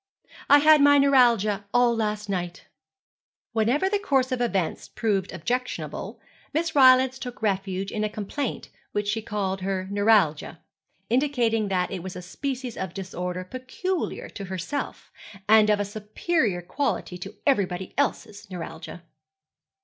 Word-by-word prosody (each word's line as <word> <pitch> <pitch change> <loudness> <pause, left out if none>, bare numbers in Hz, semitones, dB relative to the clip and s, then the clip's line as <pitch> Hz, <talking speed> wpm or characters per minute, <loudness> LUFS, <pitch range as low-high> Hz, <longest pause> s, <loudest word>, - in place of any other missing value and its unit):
'I 285 - +9
had 305 0 +6
my 285 0 +7
neuralgia 235 -7 +4
all 245 -1 +4
last 210 -1 -2
night.' 180 -2 -4 0.9
Whenever 235 - +2
the 405 +1 +1
course 270 -9 +1
of 255 -1 -1
events 195 -8 -1
proved 200 -4 -1
objectionable, 245 +9 -4 0.4
Miss 325 0 0
Rylance 260 -1 +6
took 245 -3 -8
refuge 195 -1 -1
in 215 - -2
a 215 - 0
complaint 215 +6 -4 0.2
which 205 0 -1
she 220 +2 0
called 195 -3 -3
her 190 0 -2
neuralgia, 200 -7 +2 0.5
indicating 240 -5 +1
that 180 -2 0
it 190 -3 -4
was 185 +1 -7
a 180 - -7
species 255 +5 -5
of 185 -1 -5
disorder 180 -1 -4
peculiar 260 - -4
to 200 - -7
herself, 190 +9 -5 0.4
and 215 0 +6
of 210 -1 +3
a 205 - 0
superior 210 - -1
quality 180 - -2
to 195 +4 -8
everybody 190 -9 0
else's 215 -7 -2
neuralgia. 170 -1 -8
215 Hz, 140 wpm, -25 LUFS, 190-255 Hz, 0.9 s, I